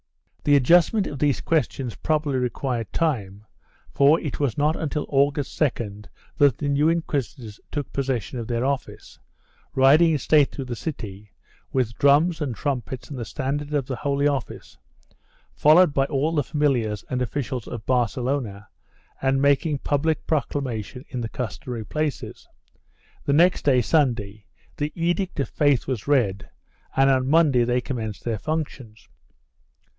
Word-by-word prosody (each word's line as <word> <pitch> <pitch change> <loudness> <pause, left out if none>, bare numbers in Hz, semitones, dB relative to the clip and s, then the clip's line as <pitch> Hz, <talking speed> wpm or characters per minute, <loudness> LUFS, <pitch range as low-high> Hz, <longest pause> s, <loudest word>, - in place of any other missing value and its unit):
1 - - -36
The 145 - +5
adjustment 175 - +4
of 140 - -6
these 145 -2 +1
questions 135 -6 -1
prob 155 -1 0
ably 140 -4 -1
required 125 -2 -2
time, 105 -11 -2 0.5
for 145 +4 +4
it 150 - -5
was 140 -7 0
not 150 +2 +2
until 150 -1 -3
August 140 0 0
2d 105 -8 -1 0.3
that 140 -5 +5
the 145 - -3
new 145 +2 +3
inquisitors 135 -9 -3
took 145 -2 -4
possession 130 -2 -2
of 115 - -5
their 120 +1 -1
office, 140 -1 -4 0.6
riding 150 +5 +5
in - - +2
state 145 +1 +3
through 135 - -6
the 125 -1 -4
city, 105 - -7 0.4
with 125 -4 0
drums 155 +4 +4
and 135 -6 -2
trumpets 130 -1 -4
and 135 - -5
the 115 - -4
standard 145 +6 -3
of 140 -3 0
the 130 -1 -4
Holy 140 0 0
Office, 140 -4 -4 0.7
followed 155 +1 +5
by 135 -1 +2
all 140 +3 0
the 150 -3 +1
familiars 120 -7 0
and 125 -1 -2
officials 125 -1 -3
of 115 -3 -7
Barcelona, 120 -3 -1 0.5
and 135 0 +2
making 145 +2 +2
public 150 +3 -1
proclamation 130 -4 -3
in 125 -2 -4
the 115 - -4
customary 120 0 -5
places. 150 +1 -4 0.8
The 140 - +1
next 175 +5 +3
day, 130 -3 +4
Sunday, 110 -9 0 0.3
the 150 +1 -2
Edict 175 +1 -1
of 140 - -1
Faith 145 -4 +2
was 130 -4 -4
read 110 -9 +1 0.5
and 135 0 +4
on 130 0 +1
Monday 150 -6 +4
they 125 +1 +1
commenced 110 -6 -5
their 115 -3 -2
functions. 135 -9 -5
135 Hz, 155 wpm, -24 LUFS, 120-150 Hz, 0.8 s, The